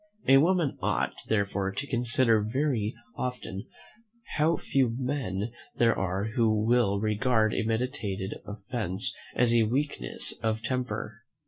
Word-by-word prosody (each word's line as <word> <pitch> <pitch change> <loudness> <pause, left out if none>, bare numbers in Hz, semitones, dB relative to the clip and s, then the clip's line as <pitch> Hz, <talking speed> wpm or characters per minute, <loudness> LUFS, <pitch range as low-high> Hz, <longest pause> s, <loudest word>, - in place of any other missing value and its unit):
A 135 0 +8
woman 170 -2 +2
ought, - - 0
therefore, 100 -2 0
to 135 +9 -3
consider 120 -3 +2
very 115 -1 0 0.2
often 125 -6 -4 0.7
how 160 +2 +3
few 130 -4 +1
men 120 -6 -2 0.2
there 115 -1 +4
are 95 +1 -1
who 110 -4 +3
will 115 -4 +3
regard 110 +1 +2
a - - +1
meditated 110 -4 -2
offence 105 -2 -3 0.2
as 120 -1 +3
a 120 - +5
weakness 135 +7 0
of 110 0 -1
temper." 115 -3 -3
115 Hz, 125 wpm, -28 LUFS, 105-130 Hz, 0.7 s, A